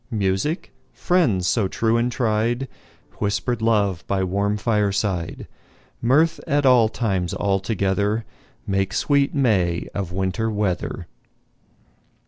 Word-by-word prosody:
Music, 105 - -1 0.2
friends 130 - +1
so 95 +2 +2
true 115 +4 0
and 120 +1 +1
tried, 115 +2 0 0.5
Whisper'd 110 +3 -1
love 100 -6 +1
by 95 -1 0
warm 100 +3 0
fireside, 105 -5 -1 0.5
Mirth 150 +7 +3
at 145 -2 +1
all 125 -4 +5
times 95 -7 -1
all 100 -1 +1
together, 100 +2 -1 0.4
Make 95 -2 -1
sweet 140 -1 +2
May 95 -11 +1
of 95 -4 -3
Winter 95 +5 -1
weather. 105 -4 -2
105 Hz, 110 wpm, -22 LUFS, 95-120 Hz, 0.5 s, all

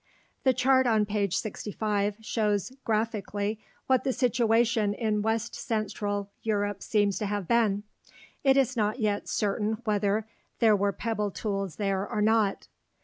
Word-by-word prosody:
The 260 - +4
chart 260 +1 +3
on 220 -2 +3
page 200 -3 0
65 210 -1 -2
shows 210 -1 0
graphically 215 -1 -1 0.3
what 260 -1 +2
the 265 - +1
situation 230 -4 +2
in 215 -3 0
west 225 +2 -1
central 205 -4 -2
Europe 205 -2 -1
seems 205 -2 +1
to 210 - -1
have 205 -3 -3
been. 215 -4 +2 0.6
It 270 -1 +5
is 260 -1 +2
not 215 -1 0
yet 210 -2 -1
certain 210 +1 0
whether 210 -1 +1 0.3
there 220 -2 +5
were 200 0 +1
pebble 210 0 -2
tools 195 -3 -3
there 195 -1 -1
or 215 - -1
not. 215 -2 +2
215 Hz, 145 wpm, -28 LUFS, 205-225 Hz, 0.6 s, It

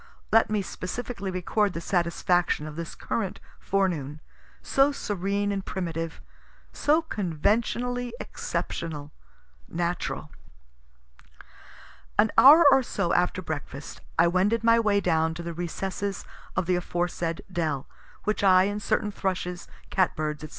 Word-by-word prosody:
Let 225 - +5
me 210 -2 0
specially 200 +2 -5
record 190 +2 0
the - - -3
satisfaction 175 -2 +1
of 155 -1 -7
this 170 0 -6
current 200 -5 -3 0.2
forenoon, 165 -7 -1 0.4
so 275 +1 +3
serene 205 -4 -1
and 195 -1 -2
primitive, 165 -3 -4 0.5
so 310 +3 +2
conventionally 235 - -1
exceptional, 150 -3 -4 0.6
natural. 175 +1 -3 1.9
An 215 +2 +4
hour 305 +5 +9
or 270 0 +6
so 175 -8 -1
after 180 +1 +1
breakfast 145 -3 -6 0.2
I 170 - +6
wended 200 +6 +2
my 230 0 +5
way 205 -3 +2
down 160 -2 +1
to 170 - -6
the 170 0 -4
recesses 190 +3 -4 0.3
of 185 - +1
the 180 0 +2
aforesaid 175 -1 -2
dell, 155 -6 -1 0.4
which 215 -1 -1
I 185 -1 +7
and 205 +2 -2
certain 210 +1 0
thrushes, 180 -3 -3 0.2
cat 185 -2 +2
birds, 150 -2 -3
&c. 155 - -7
185 Hz, 130 wpm, -27 LUFS, 170-210 Hz, 1.9 s, hour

